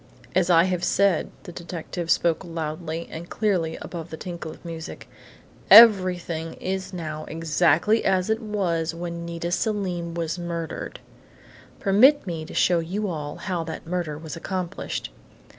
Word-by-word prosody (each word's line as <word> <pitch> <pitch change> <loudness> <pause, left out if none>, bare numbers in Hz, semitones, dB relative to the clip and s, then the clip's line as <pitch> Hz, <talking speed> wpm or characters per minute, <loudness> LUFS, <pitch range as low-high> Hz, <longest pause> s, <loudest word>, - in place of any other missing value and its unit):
"As 180 -1 +2
I 165 -1 +6
have 180 -1 -1
said," 200 -4 +2
the - - -9
detective 170 0 -6
spoke 170 +1 +2
loudly 165 -1 -4
and 170 +2 -7
clearly 180 -7 0
above 170 -1 -7
the 160 - -7
tinkle 170 -2 -6
of 155 - -12
music, 165 -1 -7 0.6
"everything 180 -7 +6
is 190 0 -4
now 155 -4 -5
exactly 165 +6 +2
as 185 -1 +2
it 220 +1 0
was 175 -7 -1
when 170 0 -5
Nita 170 0 -4
Selim 180 -5 -1
was 165 +1 -2
murdered! 170 -1 -5 0.8
Permit 245 +9 +5
me 165 -4 -4
to - - -10
show 175 -1 +3
you 190 +6 -2
all 150 -3 -4
how 180 -4 -3
that 160 - -7
murder 170 -3 -3
was 160 -1 -7
accomplished!" 180 +1 -4
170 Hz, 145 wpm, -25 LUFS, 165-185 Hz, 0.8 s, I